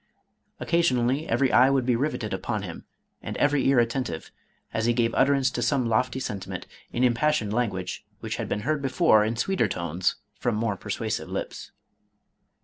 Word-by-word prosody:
Occasionally, 140 -4 +1
every 130 -2 +2
eye 130 +2 +6
would 135 -2 +2
be 125 -1 +3
riveted 120 -5 -2
upon 100 +2 -2
him, 85 -4 -8 0.4
and - - -5
every 145 -2 +2
ear 135 -1 +4
attentive, 115 -8 -1 0.4
as 110 - 0
he 120 - +4
gave 115 -1 +1
utterance 135 -1 +3
to 120 - -3
some 125 +1 +1
lofty 125 +3 +1
sentiment, 100 -7 -5 0.3
in 120 - 0
impassioned 120 -3 +2
language, 100 -6 -2 0.2
which - - -4
had - - -4
been 105 - -1
heard 150 +5 0
before, 135 -5 +4
in 110 +2 -1
sweeter 120 - +1
tones, 85 -1 -1 0.2
from 120 -3 -1
more 110 -1 0
persuasive - - -3
lips." - - -5
120 Hz, 165 wpm, -26 LUFS, 110-135 Hz, 0.4 s, eye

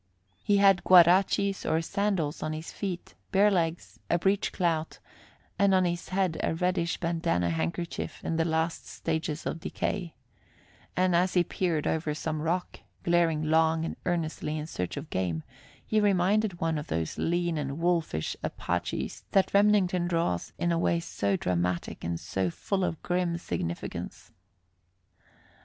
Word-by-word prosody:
He 205 - +3
had 195 -2 +5
guarachis, 185 +2 +5
or 160 - +1
sandals, 190 -5 -1
on 155 - -2
his 155 +1 -6
feet, 185 -4 -5 0.2
bare 205 +2 +5
legs, 170 -3 -1
a 170 - +3
breech 195 +4 +1
clout, 165 -3 -1 0.6
and 200 -1 +5
on 185 -1 +4
his 175 0 -2
head 185 -4 0
a - - 0
reddish 180 0 0
bandanna 165 - 0
handkerchief 85 - -3
in 165 - -1
the 165 - +3
last 160 0 -1
stages 160 -1 -3
of 165 - -3
decay; 175 +1 -3 0.8
and 185 -1 +3
as 180 +2 +2
he 175 - +5
peered 170 -3 -1
over 155 -2 0
some 155 0 -3
rock, 170 +3 -2 0.2
glaring 170 -3 +2
long 160 +1 +3
and - - -4
earnestly 155 -3 -1
in 150 - -4
search 90 - -4
of 140 +2 -7
game, 85 -4 -1 0.4
he 215 - +2
reminded 200 -1 +2
one 165 -2 0
of 150 - -7
those 80 -1 -2
lean 175 0 0
and 140 -1 -3
wolfish 165 - 0
Apaches - - -3
that 195 - +3
Remington 200 -3 +3
draws 165 - -1
in 170 - 0
a 165 - +1
way 170 0 +2
so 100 -11 -1
dramatic 90 -1 -1
and 85 0 -2
so 95 +1 -1
full 190 - -2
of 165 -3 -1
grim 175 -1 0
significance. 85 - -5
170 Hz, 150 wpm, -28 LUFS, 155-185 Hz, 0.8 s, had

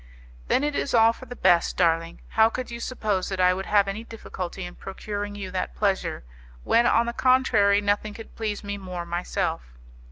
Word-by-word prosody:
"Then 270 - +2
it 295 0 0
is 280 - -1
all 225 0 +6
for 260 - -12
the 245 - -8
best, 175 -6 +3
darling. 165 -1 +1
How 220 0 +4
could 250 +1 -5
you 235 - -6
suppose 215 -6 -2
that 190 -1 -4
I 180 0 +5
would 190 +1 -5
have 200 -1 +4
any 205 +3 -4
difficulty 190 -5 -6
in 175 - -8
procuring 205 +1 -6
you 195 -2 -6
that 185 - -3
pleasure, 195 - -1 0.4
when 235 +1 +3
on 235 0 +3
the 235 - -3
contrary, 225 -6 +3
nothing 205 +1 -1
could 225 - -11
please 215 -2 -3
me 205 0 -4
more 180 -2 -6
myself? 170 - -3
205 Hz, 195 wpm, -25 LUFS, 185-225 Hz, 0.4 s, all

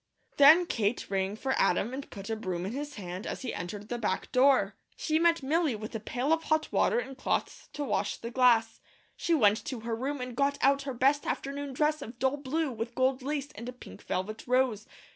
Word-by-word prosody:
Then 310 +5 +8
Kate 225 -7 -1
rang 195 +1 0
for 265 +4 -1
Adam 195 +5 +2
and 270 +1 -6
put 200 +2 -7
a - - 0
broom 185 -5 -3
in 195 - -3
his 290 +3 -5
hand 185 +1 -6
as - - -5
he 250 - -3
entered 200 +5 -6
the 240 +1 -3
back 200 -4 -2
door. 255 -7 +4 0.2
She 315 0 0
met 335 -3 +3
Milly 305 -1 +1
with 215 +2 -7
a 225 - -3
pail 250 +7 0
of 325 0 -1
hot 310 0 +1
water - - +2
and 270 - -3
cloths 260 - -2
to 295 - -3
wash 280 - -1
the 235 - -7
glass. 235 -3 +3 0.3
She 340 - +1
went 215 -6 +3
to 255 -4 -5
her 230 0 -2
room 270 +5 -3
and 250 -1 -5
got 280 +1 +1
out 275 +1 +3
her 260 - -4
best 275 +4 +2
afternoon 280 0 -3
dress 300 +3 +1
of 230 +2 -8
dull 265 +3 +1
blue 290 +2 -1
with 230 +1 -5
gold 260 0 +1
lace 285 +1 -3
and 235 +4 -7
a - - -7
pink 250 - -12
velvet 215 +6 -4
rose. 250 -4 +1
255 Hz, 220 wpm, -29 LUFS, 220-285 Hz, 0.3 s, Then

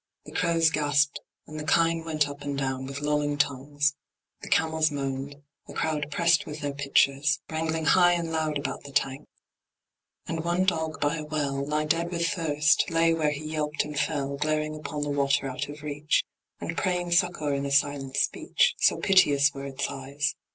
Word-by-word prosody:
The - - -10
crows 165 -1 +2
gasped, 145 -2 +2 0.3
and 155 +1 -8
the - - -4
kine 165 +1 +2
went 155 -3 0
up 145 0 -9
and 145 -1 -4
down 130 -1 -2
With 140 +1 -6
lolling 145 0 0
tongues; 145 +1 0 0.5
the - - -8
camels 160 -1 +2
moaned; 135 -1 -4 0.3
a - - -10
crowd 150 -2 -1
Pressed 170 +1 +2
with 150 0 -7
their 145 -1 -2
pitchers, 140 +1 +2
wrangling 160 0 -1
high 175 +1 +5
and 170 -1 -2
loud 155 -2 0
About 140 - -4
the 140 - -10
tank; 135 +1 -1 1.0
and 165 -1 -3
one 175 +2 +1
dog 160 -4 -1
by 145 +2 0
a 155 - -5
well, 145 -3 -2
Nigh 150 +1 0
dead 165 +2 0
with 170 -1 -1
thirst, 150 -5 +2
lay 165 0 +3
where 155 -2 +1
he 150 +1 -5
yelped 150 -1 -1
and 150 0 -7
fell, 140 -2 -1
Glaring 155 +1 -1
upon 150 -1 -4
the 145 - -2
water 140 0 +1
out 130 +2 -4
of 145 0 -9
reach, 150 +1 0 0.4
And 165 - -4
praying 180 -2 -1
succour 170 -5 +2
in 140 0 -1
a - - -4
silent 140 -1 +1
speech, - - +2
So - - +4
piteous 145 -7 +4
were 140 0 -7
its 140 0 -3
eyes. 140 +1 -2
150 Hz, 185 wpm, -27 LUFS, 140-160 Hz, 1.0 s, high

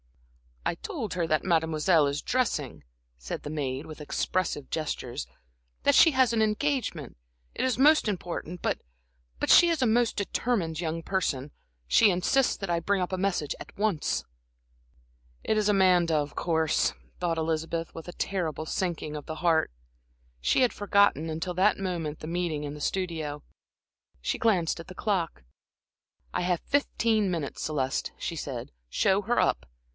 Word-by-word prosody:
"I - - 0
told 265 - -5
her 175 -2 -1
that 155 -1 +1
Mademoiselle 160 -2 +3
is 140 +1 -2
dressing," 150 - -1 0.3
said - - -6
the 145 - -5
maid, 140 -2 -3
with 155 -1 -9
expressive 150 -1 -2
gestures; 145 -4 -3 0.6
"that - - +4
she 325 - +8
has 260 -4 +3
an 225 - +2
engagement, 215 - -1 0.4
it - - -1
is 255 -4 +1
most 300 0 +5
important, 175 -3 -4
but - - 0 0.6
but - - -1
she 345 - +8
is 330 -4 0
a 255 - +4
most 235 +1 +2
determined 195 -5 -1
young 165 -1 -2
person, 150 -8 -1 0.4
she 205 - +6
insists 200 +9 +2
that 195 - -5
I 170 -1 +2
bring 195 +3 0
up 180 - -2
a 185 - -1
message 180 -6 0
at - - -11
once." 205 -6 0 1.2
"It 220 - +1
is 210 -1 +2
Amanda, 180 -4 +4
of 145 -1 -1
course," 160 -2 +1 0.3
thought 170 -2 0
Elizabeth, 165 +1 -2
with 165 - -9
a 175 - -7
terrible 170 -6 -2
sinking 165 -5 -2
of 150 - -6
the 160 - -4
heart. 160 - +2 0.7
She 260 - +3
had 250 - +3
forgotten, 200 -6 +3
until 160 +3 -3
that 195 +3 +3
moment, 170 -6 -3
the 155 - -7
meeting 170 -3 -2
in 145 -1 -4
the 150 - -9
studio. 160 -5 -2 0.8
She - - -2
glanced 185 -8 +2
at 165 - -9
the 185 - -10
clock. 180 - -1 0.9
"I - - 0
have 175 -1 0
fifteen 230 -7 +1
minutes, 165 -6 -3
Celeste," 135 -4 -1
she - - -4
said. - - -5 0.2
"Show 195 - +2
her 240 +4 +1
up. - - +1
175 Hz, 160 wpm, -28 LUFS, 155-205 Hz, 1.2 s, she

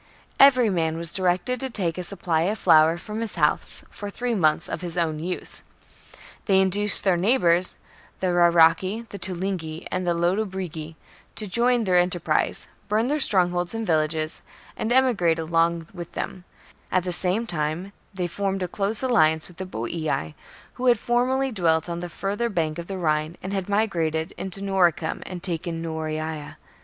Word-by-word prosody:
Every 255 -5 +6
man 165 -3 0
was 170 -1 +1
directed 185 +6 0
to 265 - -2
take 185 -8 +2
a 180 - -4
supply 175 -3 -1
of 215 - -2
flour 160 -2 +5
from 215 +5 -6
his 230 - -4
house - - 0
for 205 - -7
three 245 +4 -2
months 155 -8 +2
for - - -3
his 175 -1 -6
own 160 -3 0
use. 180 +3 -4 0.8
They 195 -2 +4
induced 200 +2 +6
their 190 -3 +3
neighbours, 180 -3 +3 0.4
the 185 -1 0
Rauraci, 175 +5 +4
the 200 - -8
Tulingi, 175 -2 -2
and 185 -1 -2
the 170 - +2
Latobrigi, 175 -3 -2 0.4
to 215 - -2
join 235 +4 +2
their 180 -3 +3
enterprise, 175 -1 +1 0.2
burn 220 +4 +1
their 300 +1 0
strongholds 180 -5 +1
and 225 0 -3
villages, 155 -2 0 0.3
and 220 - -3
emigrate 235 -11 +3
along 165 +1 0
with 175 -2 -8
them; 180 -1 -5 0.5
at 185 - +2
the 180 -1 -3
same 190 +6 0
time 170 +1 -3 0.2
they 190 -3 -3
formed 195 +2 -2
a - - -1
close 205 +6 -2
alliance 160 -10 +3
with 175 - -16
the 190 - -5
Boii, 120 - -3 0.4
who 255 - -3
had 240 -2 +5
formerly 255 +4 0
dwelt 165 -6 +1
on 170 0 -4
the 175 0 -6
further 205 +7 -2
bank 165 -5 -2
of 170 - -7
the 195 - -5
Rhine, 155 -1 -1
and 190 +2 -4
had 195 -1 -3
migrated 170 -6 0
into 190 +1 -5
Noricum 180 -4 +1
and 180 -2 -7
taken 170 -2 -3
Noreia. 155 -1 -4
180 Hz, 170 wpm, -24 LUFS, 165-205 Hz, 0.8 s, Every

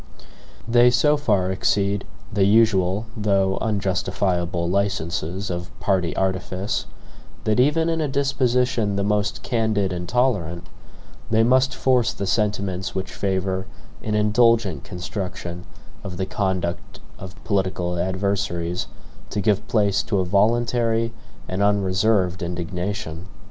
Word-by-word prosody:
They 120 +1 +6
so 150 +5 +3
far 100 -10 +1
exceed 100 +1 0 0.3
the 100 -2 +3
usual 100 -2 +3
though 100 -3 +1
unjustifiable 90 -4 0
licenses 95 -1 -1
of 90 0 -4
party 95 -4 0
artifice, 95 +1 -1 0.6
that 110 +2 +1
even 150 +5 +3
in 165 -1 0
a 150 - 0
disposition 125 -6 +1
the 100 - 0
most 105 0 0
candid 110 -5 0
and 90 0 -5
tolerant, 100 -10 0 0.6
they 110 0 +4
must 130 +2 +3
force 125 -3 +2
the 100 - -4
sentiments 100 -2 -1
which 95 0 -4
favor 95 -1 -1 0.3
an 105 -1 -2
indulgent 105 - +3
construction 90 -1 -6 0.4
of 95 -3 -6
the 95 - -1
conduct 95 -3 -2 0.2
of 95 0 -9
political 95 -3 -1
adversaries 90 -2 -1 0.4
to - - -3
give 105 0 +1
place 100 -3 +2
to 100 - -1
a 95 - +1
voluntary 115 +3 +2 0.3
and 95 +2 -2
unreserved 100 -1 +2
indignation. 90 0 -4
100 Hz, 120 wpm, -23 LUFS, 90-110 Hz, 0.6 s, They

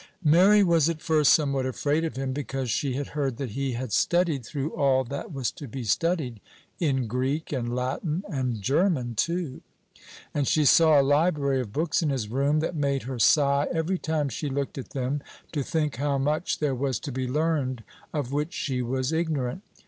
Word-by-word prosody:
Mary 185 +7 +6
was 165 -4 +3
at 165 -2 -3
first 155 -3 +3
somewhat 140 -4 +2
afraid 145 +4 0
of 165 - -3
him, 135 0 -2
because 135 -3 -3
she 140 -3 0
had 140 +2 -3
heard 140 -5 -2
that 135 -5 -4
he 135 +2 -2
had 120 -2 -4
studied 170 - +2
through 140 +5 -4
all 135 -3 +3
that 140 +6 -6
was 135 -5 -2
to 145 - -9
be 130 +2 -6
studied 130 - 0 0.4
in 135 -6 +1
Greek, 130 +7 -2
and 120 -2 -2
Latin, 145 +7 -2
and 130 - -2
German 140 - +1
too; 170 - -2 0.7
and 145 -3 0
she 155 -1 +3
saw 155 +1 +6
a - - +4
library 145 -2 +2
of 110 -5 -7
books 155 +9 0
in 160 - +1
his 125 -7 -2
room, 140 +5 +1
that 165 - -2
made 140 -2 0
her 130 0 -5
sigh 140 +4 +4
every 175 +2 -1
time 155 -2 -1
she 140 +3 -4
looked 140 0 -3
at 130 - -8
them, 140 +1 -2 0.3
to 150 - -1
think 150 -1 -1
how 140 +1 0
much 150 +5 0
there 150 -3 0
was 130 -2 -1
to 145 - -6
be 130 0 -2
learned 140 -4 0 0.3
of 145 -4 -3
which 150 +4 -2
she 130 -3 -2
was 130 +3 -1
ignorant. 160 -2 -1
140 Hz, 195 wpm, -26 LUFS, 130-155 Hz, 0.7 s, Mary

